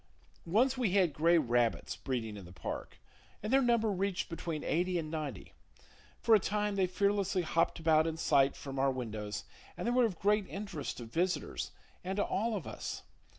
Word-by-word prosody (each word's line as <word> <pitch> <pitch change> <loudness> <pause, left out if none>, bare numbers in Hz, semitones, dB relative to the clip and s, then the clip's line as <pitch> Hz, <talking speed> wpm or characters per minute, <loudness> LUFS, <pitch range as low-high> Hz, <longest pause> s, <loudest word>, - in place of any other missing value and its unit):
Once 250 +9 +3
we 220 -7 +1
had 185 -6 +3
gray 165 +4 +4
rabbits 120 -5 +1
breeding 115 -5 -3
in 100 - -8
the 90 - -12
park, 90 - -6 0.5
and 215 +4 -1
their 270 - +6
number 235 -3 +3
reached 195 0 -1
between 165 -2 -4
eighty 180 +2 +1
and 155 -2 -3
ninety. 150 - -5 0.6
For 230 - +3
a 215 - +8
time 210 +1 -1
they 190 -2 +2
fearlessly 200 0 +1
hopped 165 +1 +1
about 160 -1 +4
in 160 0 -2
sight 135 -3 +3
from 135 -1 -6
our 135 +1 +4
windows, 110 -5 -4 0.3
and - - -4
they 240 - +2
were 250 0 +4
of 195 -7 -2
great 205 +1 +2
interest 195 -8 -5
to 120 - -6
visitors 175 +11 -1 0.3
and 190 +2 -2
to 205 - +3
all 220 +3 0
of 190 - -4
us. - - -5
175 Hz, 190 wpm, -33 LUFS, 140-205 Hz, 0.6 s, a